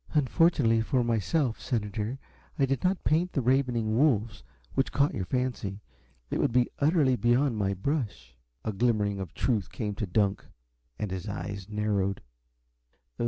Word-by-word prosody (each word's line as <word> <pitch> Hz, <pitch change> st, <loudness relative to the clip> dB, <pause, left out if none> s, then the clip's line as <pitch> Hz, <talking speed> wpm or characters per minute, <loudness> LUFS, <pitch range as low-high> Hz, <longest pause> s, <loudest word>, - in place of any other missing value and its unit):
"Unfortunately 140 Hz, -5 st, +3 dB
for 125 Hz, +2 st, +1 dB
myself, 120 Hz, -, 0 dB
senator, 110 Hz, 0 st, -2 dB, 0.4 s
I 140 Hz, -, +3 dB
did 135 Hz, +3 st, -1 dB
not 185 Hz, +1 st, +1 dB
paint 170 Hz, +4 st, +1 dB
the 140 Hz, -, +1 dB
'ravening 120 Hz, -4 st, +1 dB
wolves' 115 Hz, -5 st, +2 dB, 0.3 s
which 135 Hz, -, 0 dB
caught 145 Hz, +1 st, +2 dB
your 95 Hz, -, -2 dB
fancy. 120 Hz, -4 st, -2 dB, 0.5 s
It -, -, 0 dB
would -, -, +2 dB
be 125 Hz, 0 st, +2 dB
utterly 145 Hz, -3 st, +3 dB
beyond 120 Hz, +1 st, +2 dB
my 100 Hz, -1 st, 0 dB
brush." 105 Hz, -, -3 dB, 0.3 s
A 110 Hz, -, -1 dB
glimmering 105 Hz, -2 st, +1 dB
of 95 Hz, -, -3 dB
the -, -, -28 dB
truth 110 Hz, -7 st, 0 dB
came 105 Hz, -3 st, -3 dB
to 105 Hz, +1 st, -3 dB
Dunk, 100 Hz, +2 st, +1 dB, 0.5 s
and 105 Hz, -, -3 dB
his 95 Hz, +2 st, -4 dB
eyes 100 Hz, -1 st, -5 dB
narrowed. 105 Hz, -2 st, -1 dB
115 Hz, 155 wpm, -28 LUFS, 105-135 Hz, 0.5 s, Unfortunately